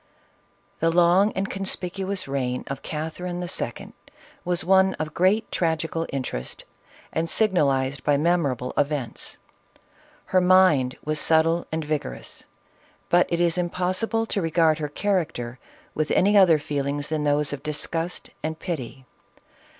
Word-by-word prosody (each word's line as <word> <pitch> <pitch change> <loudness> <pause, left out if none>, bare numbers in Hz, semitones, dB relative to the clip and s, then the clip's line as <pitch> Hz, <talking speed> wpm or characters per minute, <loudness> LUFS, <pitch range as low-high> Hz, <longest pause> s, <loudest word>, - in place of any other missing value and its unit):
THE 165 - +2
long 175 +4 +4
and 195 +1 -2
conspicuous 195 -1 -3
reign 130 -2 -2
of 135 -1 -6
Catherine 165 +3 -4
II. 175 - -5 0.5
was 175 -1 0
one 190 +1 +4
of 155 0 -5
great 195 +5 +2
tragical 165 -1 -1
interest, 125 - -5 0.5
and 165 +1 -1
signalized 140 - +1
by 145 -1 +3
mem 170 +4 +2
orable 125 -4 -2
events. 140 -5 -2 0.9
Her 185 - +2
mind 180 -9 +4
was 155 0 -1
subtle 165 +1 +2
and 160 -1 -2
vigorous, 150 -1 -5 0.6
but 175 +1 +4
it 170 - 0
is 175 0 +2
impossible 185 +6 -1
to 205 - -2
regard 165 -1 +2
her 150 -1 -3
character 155 - -2 0.3
with 155 0 -1
any 205 +3 +3
other 185 -5 +7
feelings 145 -1 -3
than 155 -1 -1
those 145 0 +1
of 140 - -5
disgust 165 +3 -3
and 160 0 -3
pity. 135 -7 -6
160 Hz, 135 wpm, -24 LUFS, 145-180 Hz, 0.9 s, other